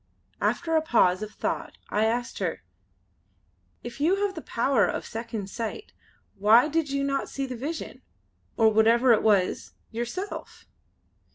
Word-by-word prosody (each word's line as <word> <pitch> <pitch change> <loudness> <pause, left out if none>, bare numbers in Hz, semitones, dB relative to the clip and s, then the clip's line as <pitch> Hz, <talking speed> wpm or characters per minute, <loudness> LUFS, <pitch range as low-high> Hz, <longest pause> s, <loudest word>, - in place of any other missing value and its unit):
After 325 -2 0
a 315 - +4
pause 195 - +3
of 215 - -4
thought - - -4
I 210 +1 +2
asked 240 +2 -2
her: 180 -4 -3 1.2
"If 240 +3 -8
you 385 +6 +2
have 400 - -2
the 325 - -7
power 240 -3 +1
of - - -3
Second 225 -3 -5
Sight 235 - -5 0.5
why 225 +7 +6
did 315 -1 0
you 275 0 -1
not 275 0 -1
see 275 - -3
the 255 -1 -5
vision, 295 +7 -6 0.6
or 225 -1 +5
whatever 230 +3 +5
it 220 - +3
was, 200 -4 +1 0.2
yourself?" 240 - -5
240 Hz, 150 wpm, -26 LUFS, 220-295 Hz, 1.2 s, why